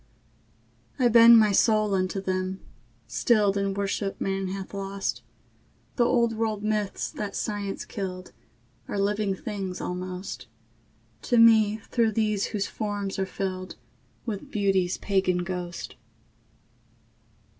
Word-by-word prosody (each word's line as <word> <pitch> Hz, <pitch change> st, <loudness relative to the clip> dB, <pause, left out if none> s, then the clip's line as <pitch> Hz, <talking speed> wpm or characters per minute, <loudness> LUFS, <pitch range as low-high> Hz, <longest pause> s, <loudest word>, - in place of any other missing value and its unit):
I 245 Hz, -2 st, +4 dB
bend 230 Hz, 0 st, +9 dB
my 215 Hz, -2 st, +5 dB
soul 215 Hz, 0 st, +3 dB
unto 185 Hz, +1 st, 0 dB
them, 185 Hz, 0 st, -2 dB, 0.5 s
stilled 210 Hz, -5 st, +2 dB
In 195 Hz, -1 st, -1 dB
worship 200 Hz, 0 st, -2 dB
man 195 Hz, 0 st, -1 dB
hath 190 Hz, +1 st, -6 dB
lost; 195 Hz, 0 st, -3 dB, 0.7 s
The 245 Hz, -, +3 dB
old 235 Hz, -2 st, +2 dB
world 220 Hz, -2 st, -1 dB
myths 210 Hz, -2 st, -1 dB
that 205 Hz, -2 st, -5 dB
science 205 Hz, -2 st, -3 dB
killed 185 Hz, -3 st, -6 dB, 0.6 s
Are -, -, -3 dB
living 200 Hz, 0 st, 0 dB
things 195 Hz, -2 st, -5 dB
almost 180 Hz, -1 st, -5 dB, 0.7 s
To 245 Hz, -, +1 dB
me 220 Hz, -2 st, +6 dB
through 230 Hz, -3 st, +2 dB
these 210 Hz, -2 st, +1 dB
whose 200 Hz, -2 st, -2 dB
forms 205 Hz, -2 st, -4 dB
are 190 Hz, -, 0 dB
filled 185 Hz, -1 st, -4 dB, 0.5 s
With 210 Hz, -5 st, -5 dB
Beauty's 195 Hz, -3 st, +1 dB
pagan 190 Hz, -3 st, +1 dB
ghost. 175 Hz, -4 st, -5 dB
200 Hz, 120 wpm, -26 LUFS, 190-215 Hz, 0.7 s, bend